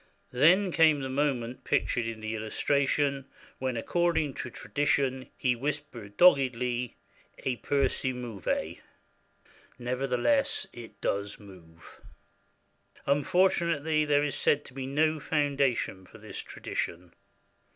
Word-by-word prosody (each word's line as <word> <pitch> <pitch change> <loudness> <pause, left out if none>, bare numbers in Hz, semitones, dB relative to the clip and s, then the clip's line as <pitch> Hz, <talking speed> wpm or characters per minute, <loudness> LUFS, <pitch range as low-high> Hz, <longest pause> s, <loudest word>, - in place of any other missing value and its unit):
Then 180 +9 +4
came 160 -3 +4
the 135 - -3
moment 130 -3 -1
pictured 120 -2 0
in 115 -1 -5
the 110 0 -3
illustration 140 +5 0 0.3
when, 130 -2 -2
according 165 +2 +1
to 125 - -5
tradition, 135 -1 -1
he 125 -2 +1
whispered 130 -6 -5
doggedly, 125 -7 +3 0.5
"E 130 - +1
pur 140 +2 +1
si 130 - -2
muove" 120 -6 -3 1.0
(Nevertheless, 125 - +1
it 110 -4 -11
does 100 0 -2
move). 90 -5 -15 1.0
Unfortunately 160 +1 +2
there 145 -1 +3
is 145 - -1
said 145 0 +1
to - - -13
be 130 0 -5
no 155 +3 +1
foundation 140 - 0
for - - -14
this - - -8
tradition. 85 +1 -5
135 Hz, 115 wpm, -29 LUFS, 120-145 Hz, 1.0 s, Then